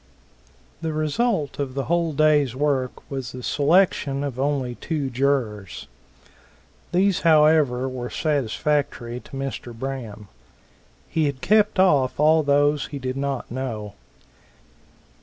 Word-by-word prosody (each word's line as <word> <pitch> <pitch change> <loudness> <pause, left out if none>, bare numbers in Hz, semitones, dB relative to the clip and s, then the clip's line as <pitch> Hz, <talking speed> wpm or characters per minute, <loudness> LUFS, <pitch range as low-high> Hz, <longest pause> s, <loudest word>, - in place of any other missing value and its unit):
The 160 -1 -2
result 155 - -1
of 135 -2 -3
the 135 - -1
whole 170 +1 0
day's 150 -4 +3
work 135 -2 -1
was 135 -3 -5
the 125 0 -8
selection 145 -2 +2
of 135 -3 -4
only 135 -3 0
two 145 0 -3
jurors. 120 -7 -1 1.1
These 190 +1 +2
however 150 -5 +4
were 125 -2 -5
satisfactory 140 -3 -1
to - - -18
Mr. 130 -3 -5
Braham. 115 -5 -6 0.8
He 160 -1 0
had 140 -3 -3
kept 210 -1 +3
off 145 -10 +3
all 155 +1 +5
those 145 0 +2
he 145 - -6
did 130 -1 -4
not 135 -3 -3
know. 115 -5 -4
140 Hz, 120 wpm, -23 LUFS, 130-155 Hz, 1.1 s, all